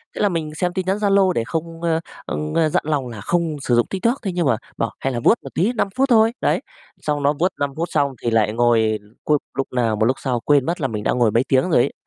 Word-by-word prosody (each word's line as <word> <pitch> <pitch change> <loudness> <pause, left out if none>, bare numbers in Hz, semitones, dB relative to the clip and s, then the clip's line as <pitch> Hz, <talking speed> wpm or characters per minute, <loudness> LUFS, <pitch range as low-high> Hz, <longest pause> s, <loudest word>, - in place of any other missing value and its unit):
Thế - - -3
là 205 - +3
mình 155 -4 -3
xem 175 +2 -1
tin 185 -1 -2
nhắn 190 +2 +1
Zalo 200 -2 +3
để 115 - 0
không, 165 +5 -5
ơ, 165 -1 +1 0.3
ơ, 155 +1 0
dặn - - 0
lòng 145 -4 -1
là 110 -4 -8
không 170 - 0
sử 120 - +1
dụng 120 - +3
TikTok, 230 +7 0
thế 195 -5 -2
nhưng 175 -1 -1
mà 120 -4 +2 0.2
bảo: 115 - -1
"Hay 135 - -2
là 120 - -2
vuốt 120 - +4
một - - -7
tí 195 +9 +1
5 230 - 0
phút 270 +1 +2
thôi." 225 -1 +5
Đấy! - - +1 0.4
Xong 150 -1 -1
nó 145 +1 +3
vuốt 180 +3 +2
5 140 -1 -1
phút 170 +2 -2
xong 140 -1 +1
thì 120 - -1
lại 110 -1 +2
ngồi 115 -2 +2 0.2
cu 150 -1 +3 0.2
lúc 135 - 0
nào 115 -3 +1
mà 110 +1 +1
lúc 130 +2 +2
sau 125 -3 -1
quên 140 +2 +3
mất 170 0 -2
là 135 - +1
mình 105 -3 -4
đã - - +1
ngồi 120 -4 +2
mấy 115 +3 +2
tiếng 130 -1 +3
rồi 140 -8 +4
ấy. 140 - -1
150 Hz, 280 wpm, -21 LUFS, 120-175 Hz, 0.4 s, thôi